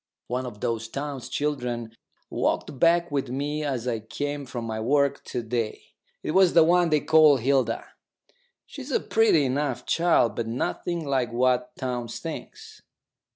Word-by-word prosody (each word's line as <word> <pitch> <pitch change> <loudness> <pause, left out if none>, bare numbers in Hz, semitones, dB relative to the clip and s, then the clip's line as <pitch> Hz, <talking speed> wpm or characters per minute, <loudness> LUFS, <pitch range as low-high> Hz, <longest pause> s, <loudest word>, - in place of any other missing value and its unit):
One 125 +1 -3
of 105 -4 -10
those 115 -2 -2
Townes 135 0 -5
children 125 -6 -2 0.4
walked 135 - -1
back 170 +1 +3
with 135 -3 -1
me 145 +4 -2
as 130 -4 -2
I 115 -2 -1
came 145 +5 -5
from 120 -1 -5
my 110 -1 -3
work 140 +4 +1
to 120 - -4
day. 115 -1 -4 0.3
It - - -2
was 185 +1 +5
the 165 - +7
one 175 +1 +3
they 155 -2 +2
call 155 -3 +6
Hilda. 130 -2 +1 0.8
She's 275 -1 -9
a 270 - +2
pretty 215 -10 +3
enough 130 -2 -1
child, 165 -10 +2
but 115 - -3
nothing 160 +8 -2
like 130 -4 0
what 125 +1 +1
Townes 125 -3 -4
thinks. - - -8
135 Hz, 155 wpm, -25 LUFS, 120-150 Hz, 0.8 s, the